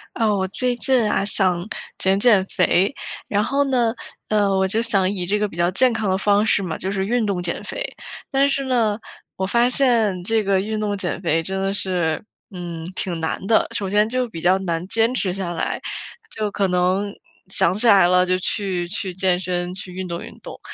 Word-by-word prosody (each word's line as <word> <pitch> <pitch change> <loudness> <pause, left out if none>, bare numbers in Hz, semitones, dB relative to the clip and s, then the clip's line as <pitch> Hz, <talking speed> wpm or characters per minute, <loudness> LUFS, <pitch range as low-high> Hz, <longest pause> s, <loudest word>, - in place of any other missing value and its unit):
啊， 220 -3 +2
我 190 -1 0
最 250 +5 -1
近 250 -5 +2
啊， 195 - +1
想 185 -2 0 0.3
减 190 +1 +1
减 205 -4 +4
肥， 185 +3 +2 0.3
然 205 0 +1
后 280 +4 +1
呢， 240 -3 +2 0.4
呃， 205 -2 +2
我 190 0 +2
就 215 +4 0
想 200 -5 +2
以 185 -3 -2
这 200 +4 +1
个 210 0 0
比 180 - -12
较 175 0 +2
健 250 +7 +3
康 220 -2 -1
的 190 - +2
方 205 +1 +3
式 210 -2 +2
嘛， 165 -4 -3
就 190 - -3
是 190 -1 -1
运 235 +2 +1
动 195 -3 -1
减 170 - -3
肥。 - - -4 0.5
但 275 +1 +3
是 275 0 0
呢， 230 -5 +1 0.4
我 190 - -2
发 235 +5 +3
现 230 -8 +2
这 220 +3 +1
个 195 -1 +2
运 215 +2 -3
动 205 -1 -1
减 185 -1 -3
肥 165 -2 +1
真 190 +3 -3
的 195 0 0
是， 180 -5 -1 0.3
嗯， 175 -3 -6
挺 175 -3 -2
难 160 +3 -3
的。 220 - +3
首 195 -2 -2
先 210 +2 +3
就 255 +1 0
比 165 -8 -8
较 185 +3 +4
难 170 -2 -2
坚 225 +4 +1
持 190 -7 0
下 185 -3 -3
来， 165 - -2 0.6
就 215 -1 -1
可 200 -1 +1
能 185 +3 +1 0.4
想 180 -2 +2
起 215 +5 +2
来 195 -5 +7
了 180 0 +4
就 185 0 +1
去 185 -2 -2
去 190 0 -4
健 185 -1 +1
身 180 -1 -2
去 185 -1 -7
运 185 0 -5
动 170 0 -4
运 - - -11
动， - - -10
195 Hz, 230 characters per minute, -21 LUFS, 180-220 Hz, 0.6 s, 来